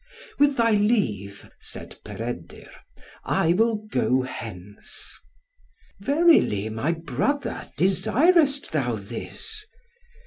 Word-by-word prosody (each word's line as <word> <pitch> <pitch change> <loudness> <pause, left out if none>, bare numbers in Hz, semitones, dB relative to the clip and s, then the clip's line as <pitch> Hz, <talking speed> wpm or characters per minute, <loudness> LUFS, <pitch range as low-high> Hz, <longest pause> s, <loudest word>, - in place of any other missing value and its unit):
"With 285 -1 +4
thy 230 -1 +4
leave," 135 - 0
said - - -10
Peredur, - - -7 0.5
"I 165 - +2
will 225 +4 +3 0.2
go 130 -7 +2
hence." 105 -6 -8 0.8
"Verily, 275 - +3
my 115 +10 -1
brother, 165 - -2
desirest 275 - +3
thou 130 -7 0
this?" 120 - -7
180 Hz, 90 wpm, -25 LUFS, -, 0.8 s, With